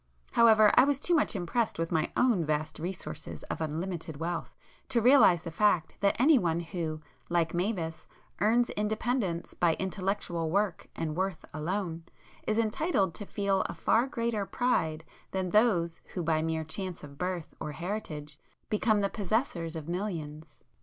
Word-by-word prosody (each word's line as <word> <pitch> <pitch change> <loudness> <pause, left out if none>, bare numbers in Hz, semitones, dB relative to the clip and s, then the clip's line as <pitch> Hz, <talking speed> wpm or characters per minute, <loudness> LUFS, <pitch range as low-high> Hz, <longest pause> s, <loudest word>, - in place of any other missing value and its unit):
However 220 -2 +6
I 250 - +7
was 280 0 +2
too 350 - 0
much 305 -8 +2
impressed 205 +5 -1
with 165 0 -2
my 160 -2 +1
own 235 -9 +3
vast 155 +1 -2
resources 160 -3 -6
of - - -4
unlimited 160 0 -3
wealth, 170 +2 -4 0.3
to 240 - +3
realize 230 - +6
the 165 - -5
fact 180 -3 +2
that 200 0 +3
anyone 235 - +4
who, 165 -3 -4 0.3
like 170 -2 +1
Mavis, 175 -3 -2 0.3
earns 235 +3 +3
independence 210 -4 -1
by 170 -2 +2
intellectual 190 -3 -2
work 200 0 0
and 155 -2 -3
worth 190 +1 -2
alone, 165 +1 -3 0.4
is 215 - +1
entitled 220 - +1
to 205 - -7
feel 200 -2 +1
a 170 - -6
far 225 +9 +2
greater 230 -5 -1
pride 160 -9 0 0.3
than 185 -2 -2
those 180 -7 +3 0.2
who 180 - -1
by 160 -1 +2
mere 160 0 -1
chance 180 +2 -5
of 140 0 -11
birth 180 -3 -3
or 150 - -4
heritage 155 -5 -5 0.3
become 215 0 +2
the 200 - +2
possessors 195 - -1
of 160 -2 -6
millions. 160 -5 -4
180 Hz, 155 wpm, -30 LUFS, 160-215 Hz, 0.4 s, I